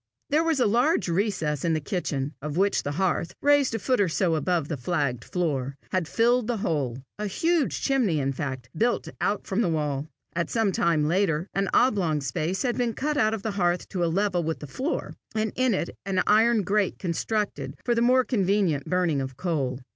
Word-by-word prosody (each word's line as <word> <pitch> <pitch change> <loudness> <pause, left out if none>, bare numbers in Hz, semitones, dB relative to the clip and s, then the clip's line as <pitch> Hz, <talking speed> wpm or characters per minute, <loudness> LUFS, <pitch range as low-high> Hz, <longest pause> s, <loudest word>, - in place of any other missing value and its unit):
There 310 +3 +4
was 325 -4 +1
a 250 - +4
large 245 - +2
recess 165 -6 0
in 165 - +2
the 155 - +1
kitchen, 150 -4 -3
of 150 +2 -4
which 200 +2 +2
the 145 - -3
hearth, 175 0 -1
raised 285 -4 +3
a - - +1
foot 250 +1 +1
or 190 - +2
so 170 +1 +1
above 165 -1 0
the 155 - -2
flagged 140 -3 -1
floor, 140 -6 -2
had 185 -4 0
filled 240 +2 +2
the 240 -2 0
whole 140 - -2 0.2
a 210 - -1
huge 325 - 0
chimney 240 - +2
in 135 0 0
fact, 130 -3 -4
built 235 +8 0
out 205 0 0
from 195 +4 0
the 210 - +1
wall. 150 -2 -1 0.3
At 170 0 -1
some 225 -4 +1 0.3
later 170 0 +1
time 195 - +1
an - - -3
oblong 190 - +3
space 155 +8 -2
had 245 -2 -1
been 235 -2 0
cut 300 +2 -1
out 220 -5 +2
of 205 - -8
the 220 - -1
hearth 180 -3 0
to 180 -3 -1
a - - +2
level 185 0 +1
with 160 -1 -2
the - - -8
floor, 260 - -3 0.2
and 215 0 0
in 255 -4 +2
it 175 - -2
an 190 0 0
iron 220 +1 +4
grate 200 0 +1
constructed 205 +4 -2
for 240 - +2
the 230 - +1
more 255 +2 +5
convenient 195 - +1
burning 175 -6 +1
of 130 -1 -6
coal. 140 -7 -2
185 Hz, 205 wpm, -26 LUFS, 155-225 Hz, 0.3 s, more